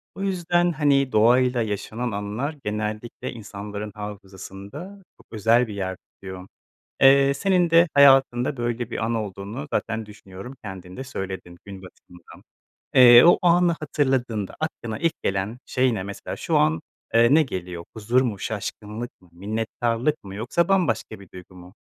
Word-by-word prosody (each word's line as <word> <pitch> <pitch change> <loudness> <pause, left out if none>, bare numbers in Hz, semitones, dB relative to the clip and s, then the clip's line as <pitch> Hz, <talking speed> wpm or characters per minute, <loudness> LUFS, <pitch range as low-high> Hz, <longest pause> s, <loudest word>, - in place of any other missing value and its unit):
O - - -7
yüzden, 175 -2 +1
hani, 140 -4 +2
doğayla 125 +3 +3
yaşanan 110 +3 -3
anılar 105 +9 -4
genellikle 105 +2 -4
insanların 105 -1 -7
hafızasında 105 - -9 0.2
çok - - -21
özel 115 +3 +3
bir 105 - -7
yer 95 -2 -4
tutuyor. 95 -1 -11 0.5
Eee, 140 +1 +6
senin 180 +3 +1
de 165 +1 +5
hayatında 135 -2 +5
böyle 120 0 -3
bir - - -4
an 115 +1 -1
olduğunu 105 +4 -5
zaten 115 -1 -2
düşünüyorum, 105 +3 -11
kendin 95 -2 -9
de 130 - -6
söyledin 95 -7 -7
gün 95 -2 -10
batımından. 90 -2 -16 0.5
Eee, 120 -1 +9
o 175 - +6
anı 175 0 +4
hatırladığında 130 -9 -1
aklına 120 -8 -4
ilk 165 -1 -1
gelen 100 +5 -2
şey 130 -1 +1
ne? 95 -4 -3
Mesela 100 +1 -7
şu - - 0
an, 80 +2 +2 0.3
eee, 115 +3 +5
ne 160 - +5
geliyor? 90 - -6
Huzur 115 +4 +1
mu, 115 -6 -2
şaşkınlık 110 +3 -5
mı, 90 - -22
minnettarlık 115 - -2
mı, 95 -1 -9
yoksa 130 +11 0
bambaşka 190 - 0
bir 100 -3 -15
duygu 90 0 -12
mu? 90 0 -14
115 Hz, 150 wpm, -23 LUFS, 100-135 Hz, 0.5 s, Eee